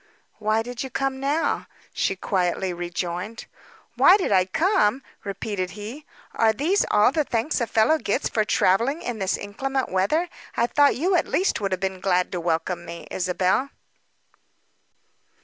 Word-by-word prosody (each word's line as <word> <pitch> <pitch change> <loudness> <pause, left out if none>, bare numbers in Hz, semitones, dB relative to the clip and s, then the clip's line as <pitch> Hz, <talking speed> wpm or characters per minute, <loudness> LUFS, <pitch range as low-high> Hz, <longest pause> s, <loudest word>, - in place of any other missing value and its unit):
"Why 215 +1 +1
did 245 +1 -6
you 265 - -4
come 270 +1 -2
now?" 285 +4 0 0.3
she 195 - 0
quietly 185 -1 -1
rejoined. 175 +4 -4 0.5
"Why 370 - +6
did 375 - -2
I 185 -2 +4
come?" 270 - +2 0.2
repeated 200 -1 -3
he. 235 +9 -8 0.3
"Are 225 -1 +3
these 335 - +1
all 210 +4 +4
the 305 +2 +1
thanks 245 +2 -1
a 235 - 0
fellow 265 +10 +3
gets 205 - -1
for 215 - +1
travelling 230 - +2
in 240 -3 -4
this 190 -1 0
inclement 265 +6 -3
weather? 200 - +1 0.3
I 235 - +3
thought 285 +3 +3
you 350 +8 0
would 360 - +5
at - - -3
least 380 - +1
have 195 -3 -1
been 190 -1 -2
glad 180 -1 +1
to 180 - -3
welcome 170 +1 -1
me, 170 0 -9
Isabel." 185 +8 0
215 Hz, 160 wpm, -24 LUFS, 185-270 Hz, 0.5 s, Why